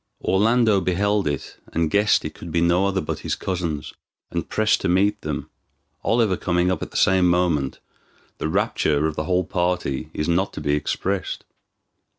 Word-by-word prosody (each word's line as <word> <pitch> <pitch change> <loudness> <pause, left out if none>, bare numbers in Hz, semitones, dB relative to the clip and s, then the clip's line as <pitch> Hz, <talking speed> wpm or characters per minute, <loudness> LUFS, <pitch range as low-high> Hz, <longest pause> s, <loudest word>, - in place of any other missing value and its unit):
Orlando 110 0 +3
beheld 100 +2 +1
it, 70 -2 -4 0.2
and 80 -1 0
guessed 105 0 +3
it - - -4
could 85 - -9
be 85 - +1
no 85 +3 +3
other 95 -1 0
but - - -4
his - - -2
cousins, 85 -5 -3 0.4
and - - -3
pressed 110 0 +2
to 95 - 0
meet 100 +3 +2
them. 75 -2 -4 0.5
Oliver 110 -5 +2
coming 90 0 +1
up 95 - -2
at - - -4
the - - -5
same 95 -2 +4
moment, 85 -7 +1 0.6
the 80 - -1
rapture 80 -6 +1
of 80 -1 -1
the 75 - -2
whole 90 0 +1
party 85 -5 -1
is 75 - -3
not 90 +3 +1
to - - -6
be 75 -1 0
expressed. 95 +6 -2
90 Hz, 175 wpm, -23 LUFS, 80-100 Hz, 0.6 s, same